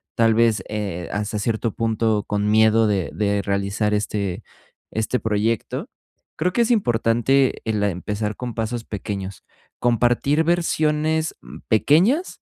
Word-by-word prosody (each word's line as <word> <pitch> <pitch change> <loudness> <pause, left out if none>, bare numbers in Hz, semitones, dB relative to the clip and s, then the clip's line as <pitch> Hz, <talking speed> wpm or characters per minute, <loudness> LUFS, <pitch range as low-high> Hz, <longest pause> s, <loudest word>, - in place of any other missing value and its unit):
tal 115 -1 +4
vez, 115 -1 +2
eh, 100 -5 -4
hasta 105 +1 -2
cierto 110 +2 -1
punto 110 -2 0
con 105 0 -1
miedo 110 +1 +4
de 95 -4 -1
de 100 -1 0
realizar 100 +2 -1
este 100 -3 -2 0.5
este 110 +3 -1
proyecto. 110 +1 -1 0.5
Creo 180 +3 0
que 240 - +2
es 235 - +2
importante, 125 - +2
eh, 110 - -1
la 105 -1 +1
empezar 105 +3 -3
con 125 -2 -5
pasos 115 +1 -3
pequeños, 100 -2 -6 0.4
compartir 120 +6 +2
versiones, 160 -2 +1
mm, - - -11
pequeñas, 180 - +2
110 Hz, 135 wpm, -22 LUFS, 105-125 Hz, 0.5 s, tal